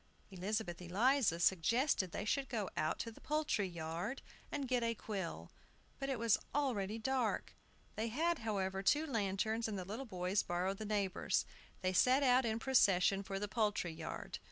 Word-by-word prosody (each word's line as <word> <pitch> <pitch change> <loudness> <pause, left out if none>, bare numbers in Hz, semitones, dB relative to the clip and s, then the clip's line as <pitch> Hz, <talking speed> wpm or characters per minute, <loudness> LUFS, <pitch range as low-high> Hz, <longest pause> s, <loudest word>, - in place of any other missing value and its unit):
Elizabeth 190 -1 -3
Eliza 205 +1 +2
suggested 190 - +2
that - - -5
they 205 - -3
should 270 +5 0
go 215 -6 -2
out 155 +1 0
to 230 - -4
the - - -16
poultry 295 -9 0
yard 170 +7 -4 0.3
and 280 -2 -2
get 250 -1 +1
a 230 0 0
quill. 195 -6 -5 0.5
But 275 0 -2
it 265 - 0
was 230 -2 +3 0.2
already 225 -8 0
dark. 250 0 -1 0.4
They 220 +2 -1
had, 325 +9 0
however, 195 -4 -1
two 295 +10 +3
lanterns, 220 -2 0
and 210 -2 -3
the 185 - -4
little 225 +8 -5
boys 185 0 0
borrowed 185 +3 -1
the 215 - -4
neighbors'. 205 -3 0 0.4
They 185 0 +1
set 255 +8 +5
out 255 -1 +5
in 220 -1 0
procession 200 -6 +4
for 195 0 -4
the 205 +1 -2
poultry 205 -6 0
yard. - - -6
215 Hz, 175 wpm, -36 LUFS, 190-250 Hz, 0.5 s, set